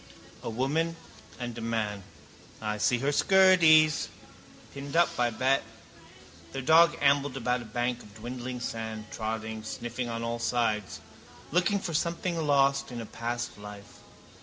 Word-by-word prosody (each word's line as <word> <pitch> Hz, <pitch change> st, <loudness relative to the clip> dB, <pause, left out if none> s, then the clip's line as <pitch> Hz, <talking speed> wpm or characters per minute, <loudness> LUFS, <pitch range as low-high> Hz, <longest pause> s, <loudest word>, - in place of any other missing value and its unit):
A -, -, -4 dB
woman 145 Hz, +8 st, 0 dB, 0.4 s
and 120 Hz, -2 st, -5 dB
a -, -, -6 dB
man. 110 Hz, -3 st, -2 dB, 0.6 s
I 105 Hz, -1 st, -3 dB
see 120 Hz, +3 st, +3 dB
her 135 Hz, +4 st, 0 dB
skirties. 165 Hz, -3 st, +5 dB, 0.7 s
Pinned 140 Hz, +1 st, -7 dB
up, 170 Hz, 0 st, +5 dB
I 120 Hz, -1 st, +3 dB
bet. 130 Hz, +4 st, +1 dB, 0.9 s
Their 135 Hz, -1 st, -4 dB
dog 165 Hz, +4 st, +6 dB
ambled 140 Hz, -1 st, +2 dB
about 125 Hz, 0 st, 0 dB
a -, -, -9 dB
bank 120 Hz, +2 st, -2 dB
of 105 Hz, 0 st, -15 dB
dwindling 125 Hz, +2 st, -6 dB
sand, 110 Hz, -2 st, -5 dB
trotting, 110 Hz, 0 st, -4 dB
sniffing 120 Hz, +2 st, -5 dB
on 115 Hz, 0 st, -4 dB
all 115 Hz, 0 st, -2 dB
sides. 115 Hz, -4 st, -1 dB, 0.5 s
Looking 180 Hz, +5 st, +2 dB
for 180 Hz, -3 st, -5 dB
something 170 Hz, +2 st, -1 dB
lost 140 Hz, -1 st, +3 dB
in 120 Hz, -, -5 dB
a 115 Hz, -, -5 dB
past 120 Hz, 0 st, -4 dB
life. 105 Hz, 0 st, -11 dB
125 Hz, 145 wpm, -28 LUFS, 115-145 Hz, 0.9 s, dog